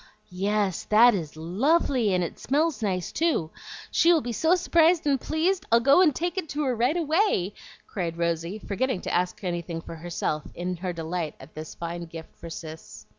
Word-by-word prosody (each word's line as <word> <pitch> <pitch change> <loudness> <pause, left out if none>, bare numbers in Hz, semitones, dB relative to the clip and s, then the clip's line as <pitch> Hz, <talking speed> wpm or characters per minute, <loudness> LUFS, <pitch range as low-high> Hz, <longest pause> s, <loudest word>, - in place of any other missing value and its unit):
"Yes, 195 0 -1
that 235 +3 +6
is 160 -6 -4
lovely, 235 - +1
and 180 -1 +2
it 170 - -6
smells 300 0 0
nice, 185 -5 -1
too. 310 - 0 0.4
She 340 - +5
will 335 - +5
be 240 - -4
so 320 - +3
s'prised 335 -1 +3
and 275 -3 +2
pleased; 350 +4 0
I'll 230 - +6
go 275 +8 +5
and 310 -7 +4
take 350 +3 -1
it 320 - -7
to 300 +1 -2
her 260 -3 0
right 250 +8 +1
away," 320 - +1 0.3
cried 170 -4 -4
Rosy, 170 +3 -1
forgetting 220 +1 -2
to - - -4
ask 180 +3 -1
anything 175 -2 -3
for 165 0 -9
herself, 160 -2 -2
in 180 +1 -3
her 180 +1 -3
delight 165 -1 -4
at 135 +4 -14
this 155 0 -8
fine 170 0 -5
gift 165 -1 -10
for 170 - -10
Cis. 160 -9 -9
200 Hz, 190 wpm, -26 LUFS, -, 0.4 s, that